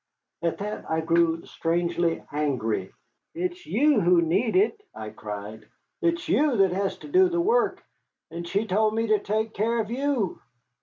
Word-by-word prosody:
At 170 -1 -1
that 210 +1 -5
I 160 0 +1
grew 165 0 +2
strangely 170 0 -1
angry. 125 -10 -1 0.4
"It's 355 +1 -4
you 290 +6 +3
who 175 0 +5
need 195 +8 +1
it," 415 +3 +2
I 105 0 -7
cried, 105 0 -8 0.3
"it's 340 0 0
you 290 -4 +2
that 195 -2 +4
has 195 +2 -1
to - - -8
do 370 +4 +4
the 345 0 -1
work. 450 +8 +1 0.5
And 170 +1 -6
she 200 +5 0
told 215 +2 +1
me 225 0 +1
to 215 -1 +3
take 220 +2 -2
care 230 +3 0
of 220 0 -2
you." 255 -6 -1
200 Hz, 165 wpm, -26 LUFS, 165-275 Hz, 0.5 s, who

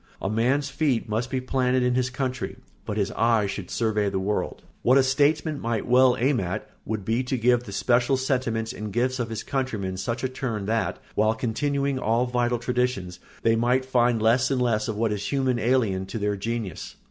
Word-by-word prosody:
A 95 - -2
man's 130 +6 +1
feet 135 -4 0
must 115 +3 -1
be 130 - -1
planted 130 0 +1
in 125 0 +2
his 130 0 +1
country, 130 -1 -3 0.3
but 105 - -3
his 100 -2 0
eyes 110 -3 +2
should 95 -3 -6
survey 105 -3 0
the 95 - -2
world. 95 -1 -2 0.2
What 130 +3 +5
a 135 - +5
statesman 145 +3 +2
might 115 -2 -2
well 125 +1 +5
aim 130 +2 +2
at 90 -1 -3 0.2
would 110 -3 -3
be 115 +4 +1
to 130 0 -2
give 120 +1 +3
the 100 - -8
special 120 +5 +2
sentiments 125 -4 -1
and 105 0 -6
gifts 130 +4 0
of 120 -1 -2
his 110 -1 -4
countrymen 110 -9 -2
such 115 +7 -3
a - - +2
turn 125 -5 -4
that, 110 +2 0 0.2
while 110 +1 +2
continuing 140 +4 -1
all 115 +1 +1
vital 120 -1 0
traditions, 120 -7 -2 0.2
they 115 0 +4
might 125 +3 +2
find 120 -3 +2
less 120 +4 +3
and 135 -2 +1
less 115 -4 +1
of 110 - -2
what 110 0 0
is 105 -1 -3
human 130 -3 +1
alien 110 -5 +1
to 115 - -5
their 105 -1 0
genius. 110 -3 -4
120 Hz, 205 wpm, -25 LUFS, 110-130 Hz, 0.3 s, What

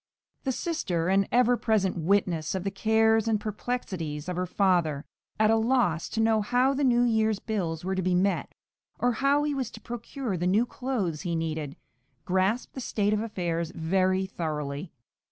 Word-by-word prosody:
The 265 - +1
sister, 190 - -1
an 195 +1 +3
ever 245 0 +4
present 215 -5 +1
witness 170 -2 +1
of 185 - -2
the 195 - -2
cares 220 +2 +3
and 220 -2 +2
perplexities 190 -8 -4
of 180 - -2
her 180 +1 -1
father, 175 -7 +1 0.3
at 215 0 +4
a - - +5
loss 225 -8 +1
to 225 - -3
know 225 -1 +3
how 250 +5 +2
the 280 +1 -1
new 245 -2 +4
year's 220 -3 +2
bills 180 -7 -3
were 190 - -1
to 190 - -1
be 180 0 +1
met, 195 +2 0 0.4
or 245 - +2
how 275 +4 +2
he 295 -1 0
was 260 -4 -2
to - - -11
procure 240 -2 -5
the 175 +1 -1
new 210 +6 +3
clothes 225 - -3
he 175 -3 -2
needed, 155 -3 -3 0.5
grasped 190 +6 0
the 265 - -6
state 210 -3 0
of 210 - +1
affairs 170 -7 -2
very 185 +3 +1
thoroughly. 155 -3 -4
200 Hz, 180 wpm, -27 LUFS, 175-230 Hz, 0.5 s, a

